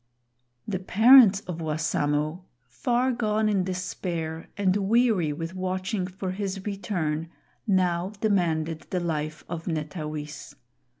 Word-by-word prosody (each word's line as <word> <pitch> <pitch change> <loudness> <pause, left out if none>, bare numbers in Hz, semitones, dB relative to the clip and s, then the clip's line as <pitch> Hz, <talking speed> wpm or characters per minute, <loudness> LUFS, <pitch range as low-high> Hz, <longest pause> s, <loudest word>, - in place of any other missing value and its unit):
The 190 -3 -2
parents 215 +1 +7
of 175 -5 -6
Wassamo, 155 +1 -1 0.2
far 245 - 0
gone 215 -3 +1
in 200 -3 +2
despair 175 -3 -4
and 195 -2 +2
weary 205 -5 +2
with 165 +4 -5
watching 185 +1 -2
for 185 0 -5
his 195 0 -4
return, 175 -6 -2 0.4
now 180 -2 +2
demanded 165 -6 0
the 185 - 0
life 155 -2 -3
of 165 -1 -6
Netawis. 150 -2 -5
185 Hz, 115 wpm, -26 LUFS, 160-200 Hz, 0.4 s, parents